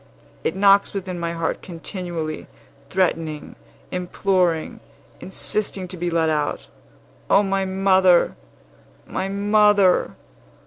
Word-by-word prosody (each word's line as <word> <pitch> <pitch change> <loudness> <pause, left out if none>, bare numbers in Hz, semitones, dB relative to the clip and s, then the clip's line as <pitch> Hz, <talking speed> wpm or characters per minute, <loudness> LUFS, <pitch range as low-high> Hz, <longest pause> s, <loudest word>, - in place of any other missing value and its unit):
It 160 - -1
knocks 200 +1 +4
within 185 -2 -4
my 170 0 -2
heart 165 -1 -2
continually, 170 -2 -6 0.4
threatening, 165 -5 -1 0.4
imploring, 180 -2 0 0.4
insisting 190 0 -3
to 185 - -6
be 175 0 -2
let 165 -1 +1
out! 150 -2 -1 0.6
O 200 - +5
my 195 -1 0
mother! 190 -2 +3 0.7
my 190 - -3
mother! 205 -1 +3
185 Hz, 100 wpm, -22 LUFS, 170-195 Hz, 0.7 s, O